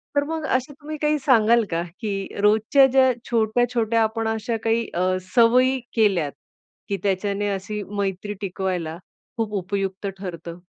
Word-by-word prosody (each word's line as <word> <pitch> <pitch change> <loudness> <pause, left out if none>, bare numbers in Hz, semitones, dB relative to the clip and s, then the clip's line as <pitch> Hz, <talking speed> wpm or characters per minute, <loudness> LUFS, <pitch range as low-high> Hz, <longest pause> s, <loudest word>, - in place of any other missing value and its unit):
तर 285 - +3
मग 320 -1 -3
असं 260 +3 -2
तुम्ही 300 +2 -8
काही 300 0 +1
सांगाल 235 -4 +4
का 165 0 0 0.2
की 215 -2 -2 0.3
रोजच्या 220 +6 +5
ज्या 260 -1 +5 0.2
छोट्या-छोट्या 230 0 +1
आपण 220 +1 -1
अशा 225 +1 -1
काही 225 +1 +1
अ, 185 +1 +1 0.2
सवयी 255 +3 +5 0.2
केल्यात 190 -10 +2 0.6
की 200 - 0
त्याच्याने 200 +1 0
अशी 205 +2 -5 0.2
मैत्री 200 +1 -2
टिकवायला 180 -4 -3 0.4
खूप 220 -2 -2
उपयुक्त 195 +1 -2
ठरतं? 170 -2 -7
215 Hz, 140 wpm, -23 LUFS, 195-240 Hz, 0.6 s, रोजच्या